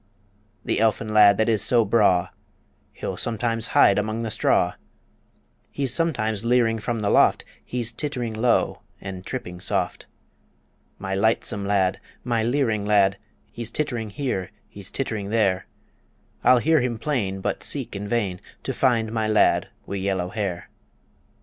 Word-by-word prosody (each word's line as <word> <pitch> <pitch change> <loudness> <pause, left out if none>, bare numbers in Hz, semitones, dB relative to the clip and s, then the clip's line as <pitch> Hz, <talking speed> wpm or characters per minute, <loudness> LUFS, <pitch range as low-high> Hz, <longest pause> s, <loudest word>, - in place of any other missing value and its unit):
The - - 0
elfin 110 0 +1
lad 105 -2 +7
that 110 - +2
is 110 -3 +2
so 120 -3 +3
braw, 95 -4 +3 0.6
He'll - - -5
sometimes 115 0 -1
hide 100 - +6
among 110 +2 -2
the 110 - -3
straw; - - +2 1.0
He's 135 -3 -2
sometimes 110 - 0
leering 115 -2 +2
from 115 +1 -3
the 100 - 0
loft - - +4 0.2
He's 120 -2 -3
tittering 125 -3 -3
low 115 +2 +1 0.2
and 95 -2 -7
tripping 90 -7 -6
soft. - - -2 0.9
My 95 - -4
lightsome 105 0 0
lad, 95 -2 +1 0.2
my 120 -2 0
leering 115 -3 0
lad, 100 -2 +3 0.3
He's 120 0 -5
tittering 120 -5 -2
here; 100 -5 -3 0.2
he's 100 -2 -10
tittering 110 -7 -3
there 100 -4 +1 0.8
I'll 125 - +6
hear 155 +4 +3
him 120 -2 -1
plain, 110 -7 -2
but - - -2
seek - - -1
in 100 +1 -5
vain 100 -5 -1 0.2
To 135 - -3
find 115 -4 +1
my 110 -1 -1
lad 110 0 +3 0.2
wi' 100 - -4
yellow 95 -2 -1
hair. 95 -4 -4
110 Hz, 145 wpm, -24 LUFS, 100-120 Hz, 1.0 s, lad